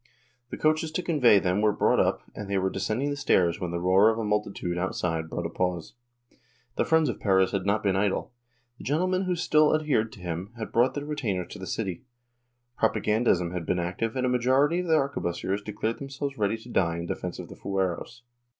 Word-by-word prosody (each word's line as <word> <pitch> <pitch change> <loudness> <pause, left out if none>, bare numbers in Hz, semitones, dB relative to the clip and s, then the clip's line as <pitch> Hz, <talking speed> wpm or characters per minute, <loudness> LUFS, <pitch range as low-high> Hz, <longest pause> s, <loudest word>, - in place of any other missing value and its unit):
The - - -6
coaches 155 +1 +1
to 180 - -1
convey 135 - +5
them 95 +1 +1
were 105 0 +4
brought - - +2
up - - +1
and 100 -1 -7
they 100 - +1
were 95 0 0
descending 110 +9 -1
the - - -2
stairs 90 -11 +2
when 90 - -3
the 85 0 -3
roar 95 +4 +5
of 110 - 0
a 115 - -2
multitude 105 -4 -1
outside 85 -2 -2
brought 85 - -4
a - - -2
pause. 90 -2 -2 0.8
The - - +1
friends 160 -1 +3
of 120 - -3
Perez 95 -2 +3
had 100 -1 -2
not 105 +2 +1
been 100 -2 +2
idle. 100 +4 0 0.5
The - - -9
gentlemen 185 +6 0
who 180 -1 0
still 155 -3 +3
adhered 145 -8 0
to - - -13
him 90 +4 -5
had 110 - -5
brought 120 +3 +2
their 145 0 -4
retainers 105 -12 -3
to - - -9
the 95 - -7
city; 95 -2 -3 0.8
prop 110 - +2
agandism 105 -6 +1
had 90 -2 -3
been 90 - +1
active 90 +7 -2
and 130 -1 0
a - - +2
majority 130 +6 +2
of 180 - -3
the 160 - +4
arquebusiers 100 - -2
declared 110 +2 -3
themselves 140 0 -5
ready 105 -1 0
to 115 +2 -14
die 85 -7 +1
in 85 - -4
defence - - -4
of - - -8
the - - -10
fueros. 95 +5 -3
105 Hz, 215 wpm, -27 LUFS, 95-135 Hz, 0.8 s, convey